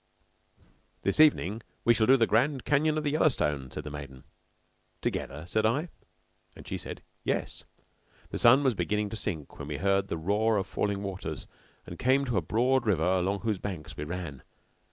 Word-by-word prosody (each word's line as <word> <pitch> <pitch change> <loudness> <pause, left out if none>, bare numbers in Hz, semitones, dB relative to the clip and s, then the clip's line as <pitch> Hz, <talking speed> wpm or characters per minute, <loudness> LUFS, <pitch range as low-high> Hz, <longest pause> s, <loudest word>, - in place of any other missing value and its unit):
"This 100 - +1
evening 115 - +4 0.2
we 120 - +6
shall 110 -1 +2
do 135 +1 +7
the 115 - +4
Grand 130 +5 +1
Canyon 150 +1 +2
of 155 - -1
the 145 - 0
Yellowstone," 75 - +1
said - - -6
the 75 - -7
maiden. 70 -3 -8 0.8
"Together?" 75 +4 -3
said 110 +5 0
I; 140 +10 +1 0.7
and - - -13
she - - -3
said, - - -7 0.2
"Yes." - - -2 0.7
The - - -3
sun 130 +4 +6
was 130 -3 +3
beginning 105 +2 -1
to - - -4
sink 80 -9 -5
when 70 - -6
we 75 -1 -3
heard 100 +2 +1
the 85 - -3
roar 105 +6 +1
of 95 - 0
falling 100 0 -2
waters 95 -2 -5 0.4
and 85 - -9
came 135 +2 +3
to 120 -5 -1
a - - +3
broad 120 +8 +1
river 85 -6 +2
along 95 +2 +1
whose 110 -4 -1
banks 90 -7 -6
we 75 - -5
ran. 80 -4 -5
105 Hz, 185 wpm, -29 LUFS, 85-125 Hz, 0.8 s, do